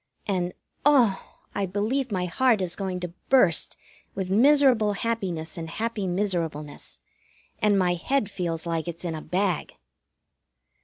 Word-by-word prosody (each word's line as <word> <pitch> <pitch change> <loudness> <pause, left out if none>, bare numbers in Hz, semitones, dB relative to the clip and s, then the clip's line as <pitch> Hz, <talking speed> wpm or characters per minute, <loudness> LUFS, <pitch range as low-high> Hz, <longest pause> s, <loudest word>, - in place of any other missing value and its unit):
And 180 -3 -1 0.3
oh! 250 -9 +3 0.2
I 200 -1 -1
believe 220 +7 -1
my 185 -2 0
heart 230 +5 +2
is 180 -2 -1
going 190 -2 -3
to 175 -1 -5 0.2
burst 220 - +4 0.4
with 190 -2 -3
miserable 250 -2 +5
happiness 190 -8 -3
and 165 -1 -6
happy 220 +1 -2
miserableness, 170 -6 -2 0.6
and 210 -1 +3
my 180 -2 +3
head 210 +4 -1
feels 170 -4 -2
like 165 -1 -2
it's 170 +1 -6
in 170 - -2
a 155 - -5
bag. 180 +1 -1
190 Hz, 140 wpm, -26 LUFS, 175-220 Hz, 0.6 s, miserable